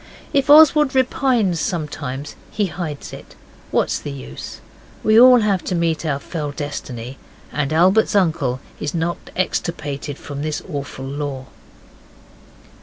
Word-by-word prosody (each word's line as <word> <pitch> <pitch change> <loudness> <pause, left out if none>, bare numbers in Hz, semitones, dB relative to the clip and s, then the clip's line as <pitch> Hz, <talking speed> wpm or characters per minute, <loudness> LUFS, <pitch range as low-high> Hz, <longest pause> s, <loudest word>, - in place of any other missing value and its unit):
If 275 0 +2
Oswald 300 -2 +7
repines 250 -8 +2
sometimes, 145 -5 -4
he 210 - 0
hides 165 -5 -6
it. - - -11 0.3
What's - - +1
the - - -6
use? 65 -1 -8 0.4
We 220 +1 +6
all 250 -1 +8
have 200 -4 +1
to 185 - -1
meet 165 -1 0
our 140 -2 0
fell 150 +1 -5
destiny, 135 -4 -6 0.3
and 145 0 -1
Albert's 190 +8 +4
uncle 155 -9 +1 0.2
is 150 +2 -3
not 170 +1 -2
extirpated 145 -5 -2
from 145 -1 -7
this 155 0 -2
awful 140 -5 -6
law. 140 -1 -4
160 Hz, 130 wpm, -20 LUFS, 140-195 Hz, 0.4 s, all